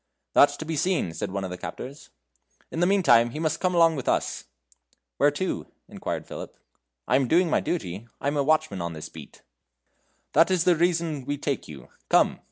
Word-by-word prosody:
"That's 145 0 +5
to 160 - -6
be 160 0 -3
seen," 165 - 0
said - - -4
one 100 +1 -3
of 95 - -5
the 90 - -6
captors. 135 +3 -8 0.6
"In 160 - -4
the 175 - +3
meantime 135 -13 +5
he 135 - -6
must 155 -1 -1
come 180 -1 0
along 165 -1 +5
with 135 - -3
us." - - -1 0.7
"Where 145 - +5
to?" 145 +6 -3 0.2
inquired - - -5
Philip; - - -8 0.5
"I 125 - +4
am 135 -2 +1
doing 170 +4 +3
my - - +3
duty. 105 - -4
I - - -8
am 145 - 0
watchman 140 - +1
of 85 -1 -4
this 80 - -7
beat." - - -13 0.9
"That's 175 0 +4
the 180 -1 +4
reason 165 -4 0
we 145 +1 -2
take 140 -1 -3
you. 75 -3 -11 0.2
Come." - - +3
145 Hz, 190 wpm, -26 LUFS, 120-170 Hz, 0.9 s, That's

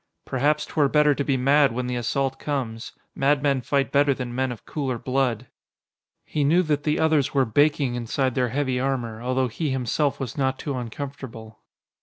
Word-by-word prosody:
"Perhaps 150 +3 +1
'twere 150 -3 +1
better 150 0 +4
to 140 - -2
be 135 -1 +1
mad 135 0 +4
when 125 +1 -2
the 125 0 -2
assault 135 +3 -1
comes. 120 -6 -4 0.2
Madmen 140 -1 +2
fight 140 +2 0
better 140 -1 +3
than 125 -2 -5
men 130 +1 -1
of 120 - -9
cooler 135 -5 -3
blood." 130 -2 -1 0.8
He 150 - -1
knew 170 +6 +4
that 150 -3 0
the 150 +1 0
others 155 -4 +2
were 135 -1 +4
baking 145 +2 +2
inside 120 +2 -1
their 125 -1 +1
heavy 130 0 -1
armor, 120 -4 -2
although 130 +1 0
he 150 +6 -3
himself 135 +2 0
was 135 0 -5
not 130 -1 +1
too 140 -3 -4
uncomfortable. 120 -2 -7
135 Hz, 180 wpm, -24 LUFS, 125-145 Hz, 0.8 s, better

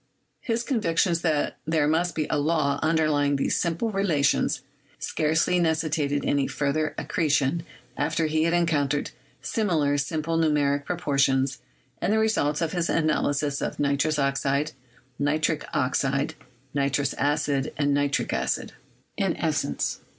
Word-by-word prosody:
His 230 0 -1
conviction 190 - +1
that 155 -4 0
there 155 -2 +1
must 170 +3 +1
be 155 - 0
a 150 - +1
law 145 -2 +1
underlying 155 -3 +2
these 135 - 0
simple 170 +7 -1
relations 160 -11 +1 0.4
scarcely 160 +3 +1
necessitated 155 -3 0
any 140 -1 +1
further 145 +2 -1
accretion 150 0 +1 0.3
after 165 0 0
he 155 +1 +1
had 170 - +1
en 175 0 +3
countered 145 -3 0 0.3
similar 155 -10 +1
simple 160 +3 -1
numerical 145 -3 +1
proportions 140 -5 +1 0.4
in - - 0
the 215 - +3
re 220 0 +3
sults 150 -6 0
of 165 - -1
his 175 -2 -1
analysis 145 -3 +1
of - - -3
nitrous 145 +2 +1
oxide, 140 +1 0 0.5
nitric 155 +2 0
oxide, 140 +3 0 0.4
nitrous 140 0 0
acid 145 -1 0
and 145 -1 +2
nitric 145 0 0
acid - - -2 0.2
— - - -17
i.e. - - +1
150 Hz, 135 wpm, -25 LUFS, 140-165 Hz, 0.5 s, en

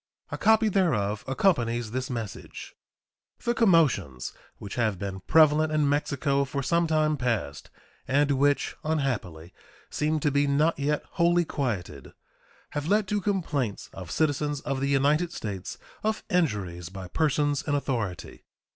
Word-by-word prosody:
A - - -3
copy 220 0 +4
thereof 125 - +1
accompanies 120 - +1
this 130 +1 -3
message. 115 -7 -6 0.7
The 235 - +1
commotions 145 - +2 0.2
which 100 - -8
have 110 -5 0
been 95 0 -5
prevalent 155 - +4
in 150 -1 +2
Mexico 140 -1 +1
for 140 +1 -3
some 170 +4 +2
time 155 -1 +2
past, 115 - -2 0.4
and 145 +2 +2
which, 140 +1 +1
unhappily, 120 - -2 0.4
seem 155 +1 0
to 145 - +2
be 145 +1 +2
net 150 +3 +2
yet 150 +1 0
wholly 175 -1 +2
quieted, 100 - -4 0.6
have 145 +1 -3
led 205 +1 +2
to 205 -1 0
complaints 160 - -2
of 90 -2 -8
citizens 145 -1 0
of 135 -1 -2
the 140 - 0
United 145 +5 +2
States 105 - -6 0.2
of 220 0 -1
injuries 100 - -1
by 95 -1 -8
persons 145 - +1
in 145 - +1
authority. 115 -10 -3
140 Hz, 140 wpm, -27 LUFS, 110-155 Hz, 0.7 s, copy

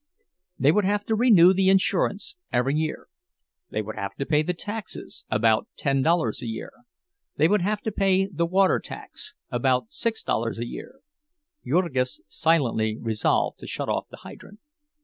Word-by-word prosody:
They 140 - +4
would 210 +5 +2
have 205 +1 0
to 220 - 0
renew 205 -6 +6
the 190 0 +3
insurance 195 - +1 0.2
every 125 +3 +1
year; 155 +1 -2 0.6
they 110 - -2
would 110 +1 -7
have 100 0 -4
to 140 - -3
pay 150 0 +3
the 180 +4 -2
taxes, 210 +3 -6
about 110 0 +2
ten 135 -2 +1
dollars 165 +2 +1
a 120 - -5
year; 110 - -5 0.6
they 155 - +4
would 205 +2 +2
have 210 +3 -1
to 220 - -2
pay 195 -1 +2
the 170 -3 -2
water 190 +2 +3
tax, - - -9 0.2
about 130 - 0
six 230 -7 -1
dollars 115 0 -1
a 120 - -3
year—(Jurgis 295 - -4
silently 115 -6 +1
resolved 110 -2 0
to - - -9
shut - - -3
off - - -1
the - - -11
hydrant). 205 +2 -13
170 Hz, 165 wpm, -25 LUFS, 130-205 Hz, 0.6 s, renew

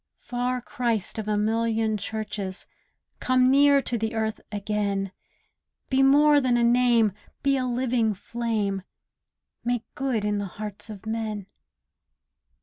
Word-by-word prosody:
Far 245 +1 -2
Christ, 235 -5 -1
of 215 - -5
a 210 -1 +1
million 225 +1 +1
churches, 205 -2 -3 0.5
Come 255 0 +3
near 280 0 +5
to 235 - -1
the 220 +1 -2
earth 220 -1 -2
again; 200 -2 -1 0.8
Be 265 0 +3
more 290 +2 +6
than 250 -2 +2
a 240 - +2
Name; 235 -3 +4 0.3
be 275 0 +3
a 260 -1 0
living 240 -3 +1
Flame; 210 -2 -2 0.8
'Make 240 -1 -1
Good' 250 -6 -1
in 210 0 0
the 200 - -3
hearts 210 0 -6
of 210 -1 -9
men. 220 -2 -3
225 Hz, 135 wpm, -26 LUFS, 210-250 Hz, 0.8 s, more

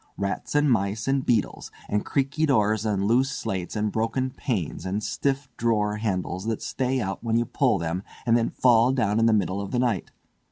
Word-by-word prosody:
Rats 100 +8 -3
and 145 0 +4
mice, 110 -2 0
and 135 0 +1
beetles; 115 -6 0 0.2
and 105 0 0
creaky 140 +3 0
doors, 110 -4 +2
and 100 -2 0
loose 125 +5 +3
slates, 95 -9 -4
and 105 0 0
broken 115 +4 -1
panes, 110 - -3
and 100 +3 -2
stiff 140 +3 -1
drawer 105 -3 +1
handles, 95 -3 -2
that 115 -1 -2
stay 130 0 -1
out 95 -2 -3
when 115 -1 0
you 120 - +1
pull 120 -2 +1
them 85 +1 -2 0.2
and 115 -1 +4
then 115 -1 +2
fall 120 0 +4
down 110 -4 +1
in 115 - +4
the - - +4
middle 100 -2 +1
of 100 - -5
the 125 - -2
night. 120 -6 0
115 Hz, 200 wpm, -25 LUFS, 100-130 Hz, 0.2 s, and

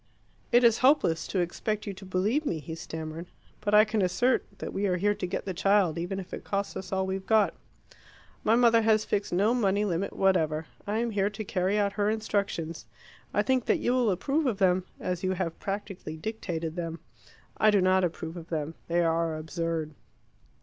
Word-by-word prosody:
"It 240 +1 +5
is 230 -2 +5
hopeless 255 - +3
to 190 - 0
expect 210 +5 -2
you 200 - -4
to 195 +1 -11
believe 200 +11 0
me," 175 - -1
he 160 +1 -7
stammered. 160 +1 -6 0.3
"But 210 0 +1
I 215 +1 +8
can 215 -1 0
assert 240 +8 +2
that - - -6
we 200 +1 0
are 180 -1 +1
here 205 +3 +2
to 185 - -4
get 180 - -3
the 190 - -3
child, 190 -3 +2
even 180 +3 -3
if 185 - -9
it - - -6
costs 200 0 -2
us 185 -1 -6
all 190 0 0
we've 190 0 -4
got. 220 -1 +4 0.9
My 220 - +4
mother 230 -1 +5
has 215 -1 +3
fixed 200 0 -1
no 200 +6 +3
money 205 -4 +2
limit 190 0 -1
whatever. 160 -5 +1 0.2
I 210 +2 0
am 235 0 0
here 200 -1 +1
to 210 +1 -6
carry 190 +1 0
out 200 -1 +1
her 205 0 +1
instructions. 200 -7 -2 0.4
I - - +2
think 260 -3 +1
that - - +3
you 245 - 0
will 250 -3 +2
approve 275 - 0
of 225 -6 0
them, 185 -2 +2
as 180 -1 -3
you 185 0 +1
have 175 -3 -3
practically 195 -5 -5
dictated 170 -4 -4
them. 165 -2 -4 0.6
I 215 - +5
do 205 -1 +4
not 185 0 +3
approve 165 -1 -3
of 170 -1 -9
them. 155 -1 -2
They 170 +1 +2
are 165 -1 +1
absurd." 160 -1 -3
190 Hz, 205 wpm, -28 LUFS, 170-210 Hz, 0.9 s, I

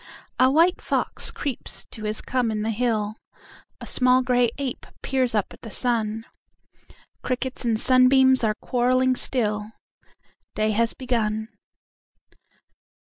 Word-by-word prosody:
A 255 0 +5
white 330 +6 +3
fox - - -1
creeps 275 -5 -4
to 220 - -7
his 210 0 -2
come 250 -2 -1
in 215 -1 -2
the 225 - -1
hill,A 220 -2 -5
small 255 0 +3
gray 245 -1 +2
ape 275 -3 -5 0.2
peers 255 -4 0
up 210 - -1
at - - -16
the 225 - -9
sun; 225 -1 -1 1.0
Crickets 260 +1 -3
and 225 -2 +1
sunbeams 260 +1 +5
are 215 -1 +1
quarrelling 255 +2 +1
still; 215 -4 -1 0.8
Day 215 0 +1
has 230 +2 +1
begun. 220 -4 -2
245 Hz, 125 wpm, -24 LUFS, 220-255 Hz, 1.0 s, A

